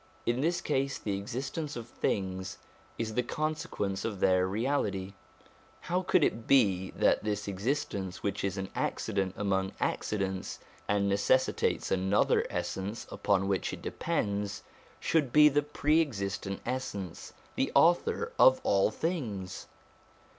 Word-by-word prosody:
In 120 +2 +1
this 170 +3 +1
case, 135 -2 0
the 100 -2 -2
existence 135 +9 -4
of 120 -1 -6
things 95 -5 -2 0.4
is 110 -1 -2
the 125 - +2
consequence 120 -9 -2
of 105 -4 -3
their 95 0 +3
reality: 100 -3 -1 0.7
how 180 +2 0
could 180 -3 +3
it 115 -4 0
be 95 -8 +4
that - - +3
this 105 -1 -2
existence, 100 -3 -2
which 100 0 -1
is 95 0 -1
an 95 0 -4
accident 95 -1 -1
among 95 -1 0
accidents, 95 -3 -2 0.3
and 100 -1 +2
necessitates 100 +6 +2
another 95 +2 +2
essence 100 +4 -3
upon 95 -2 +1
which 95 -2 0
it - - -8
depends, 100 0 -2 0.4
should 150 -6 +1
be 150 +2 +8
the 145 +1 +2
Pre 150 +2 +2
existent 100 -7 -3
Essence, 105 -8 -4 0.2
the - - 0
Author - - +3
of 130 0 +7
all 100 0 +3
things 110 - -3
100 Hz, 130 wpm, -30 LUFS, 95-130 Hz, 0.7 s, be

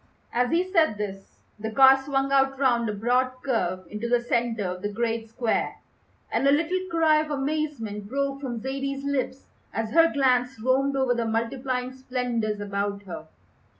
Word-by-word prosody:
As 245 +1 +2
he 335 +3 +2
said 330 - +2
this 195 -2 -6 0.2
the 220 +1 -3
car 265 +4 +7
swung 275 -1 0
out 270 0 +3
round 240 -4 +2
a - - 0
broad 245 +5 +1
curve 185 -8 -1
into 210 +5 -4
the 245 0 +4
centre 235 -2 0
of 180 0 -4
the 205 - -2
great 225 +1 -2
square, 225 0 -1 0.6
and 275 - +2
a - - +6
little 335 +5 +2
cry 320 -2 +4
of 310 - -5
amazement 275 -8 -3
broke 275 +1 -2
from 245 -4 -4
Zaidie's 275 +2 -3
lips 265 -2 -2 0.3
as 225 -1 -3
her 330 +1 +5
glance 250 -3 +2
roamed 265 +4 +2
over 265 -2 +2
the 235 -1 -1
multiplying 250 +3 -2
splendours 245 -5 -2
about 200 0 -3
her. 175 -4 -8
250 Hz, 170 wpm, -26 LUFS, 220-275 Hz, 0.6 s, car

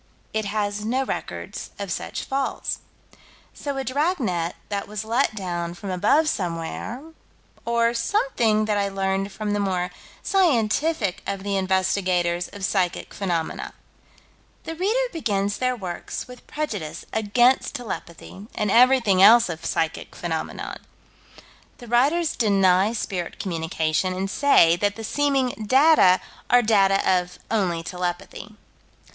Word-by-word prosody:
It 220 -1 -1
has 205 0 -2
no 255 +5 0
records - - -5
of - - -5
such - - -4
falls. 270 0 -2 0.7
So 280 -2 -5
a 270 - -1
dragnet 255 - -1
that 200 -1 -3
was 210 +1 -5
let 230 +1 +1
down 175 -3 -4
from 195 +2 -6
above 215 - +3
somewhere 180 - -3 0.6
Or 235 0 +2
something 235 - +1
that 210 -1 0
I 200 0 0
learned 195 0 -1
from 210 +1 -3
the 205 - 0
more 180 -3 -1 0.3
scientific 290 - +1
of 195 -1 -3
the 200 0 -1
investigators 185 -2 +1
of 200 -2 -5
psychic 185 -3 -1
phenomena: 175 -5 -3 0.9
The 325 - -5
reader 430 +9 0
begins 205 - -1
their 255 0 +1
works 185 -1 -6
with 250 -1 -13
prejudice 210 - -4
against 240 +4 +2
telepathy 200 -3 -7
and 210 -2 0
everything 235 -5 +5
else 230 +2 +8
of 160 -1 -6
psychic 160 0 -2
phenomena. 165 -2 -4 1.0
The 245 - -11
writers 290 +8 +2
deny 195 -2 +3
spirit 185 -6 -4
communication, 160 0 -1
and 190 +1 -3
say 180 -13 +5
that 205 +2 0
the 225 - -7
seeming 275 +1 +1
data 260 - +5 0.3
are 245 0 +5
data 195 -3 +4
of 180 -1 +1
"only 180 -7 0
telepathy." 180 0 -5
205 Hz, 130 wpm, -24 LUFS, 185-245 Hz, 1.0 s, else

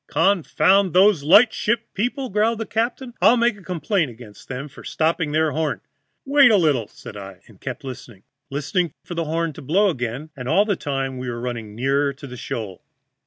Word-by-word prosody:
"'Confound 190 +2 +3
those 190 -2 +5
light 205 +11 +6
ship 235 +1 -1
people,' 250 +5 -2
growled 215 +3 +2
the 225 - -3
captain. 240 +3 -2
'I'll 220 +7 +6
make 230 -4 +1
complaint 175 -2 -1
against 115 -3 -13
them 130 +2 -5
for 145 - -14
stopping 160 -1 0
their 155 0 +2
horn.' 155 -1 -2 0.4
"'Wait 275 -2 +6
a 215 - +5
little,' 145 - +2
said - - -12
I, 95 -2 -10
and 105 -5 -20
kept 130 -1 -6
listening, 120 -6 -9 0.3
listening 150 +4 -1
for - - -6
the 165 -1 -2
horn 165 +1 -1
to - - -10
blow 190 +9 +2
again, 130 +3 -5
and 125 -2 -6
all 205 - +4
the 205 -2 0
time 135 -4 -3
we 125 -1 -4
were 120 0 -4
running 115 -4 -5
nearer 140 +3 +1
to 135 +2 -11
the 125 -2 -9
shoal. 110 -6 -6
155 Hz, 195 wpm, -22 LUFS, 130-200 Hz, 0.4 s, light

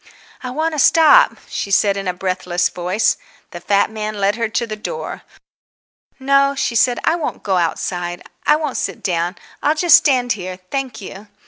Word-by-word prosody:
"I 255 - -5
want 315 +6 -1
to 305 - -3
stop," 330 - +5
she 200 - -4
said 200 0 +3
in 195 -1 -4
a - - +1
breathless 180 -1 -1
voice. 180 +5 0 0.3
The - - -8
fat 200 +1 +1
man 215 -1 -4
led 200 +1 +2
her 230 -1 -2
to 235 - -1
the 215 -2 -5
door. 470 - -6 1.0
"No," 275 +1 +3
she 260 - -1
said, 240 +1 +3
"I - - +2
won't 335 -3 -4
go 190 -2 0
outside. 175 +1 -2 0.2
I - - +4
won't 300 -3 -3
sit - - -4
down. 175 0 -1 0.3
I'll 300 +2 +2
just 335 0 +7
stand 255 -4 +1
here, 185 -3 -4
thank 270 -4 -4
you." 195 +2 -10
220 Hz, 185 wpm, -18 LUFS, 185-275 Hz, 1.0 s, just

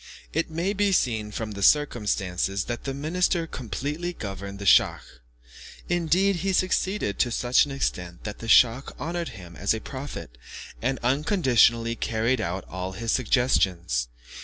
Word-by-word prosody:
It 165 +1 0
may 170 +5 -1
be 205 0 +1
seen 110 - +1
from 110 +1 -5
this 100 -1 +3
circumstance 105 -10 +1 0.2
that 120 0 -5
the 135 - -2
minister 170 +3 0
completely 145 - -4
governed 100 - -6
the 100 - -7
schach; - - +5 0.9
indeed 175 +3 +2
he 190 +3 -1
succeeded 185 - 0
to 120 - +3
such 120 +3 +3
an 145 - -8
extent, 90 -10 -3
that 105 -1 -6
the 115 - -7
schach 120 +3 +4
honoured 170 +2 -3
him 90 -2 -11
as - - +1
a - - -4
prophet, - - -8 0.4
and 130 +3 0
unconditionally 120 - +3
carried 115 +2 0
out 90 0 -3
all 95 +1 -5
his 115 +4 -2
suggestions. 95 - +1
120 Hz, 150 wpm, -25 LUFS, 100-160 Hz, 0.9 s, schach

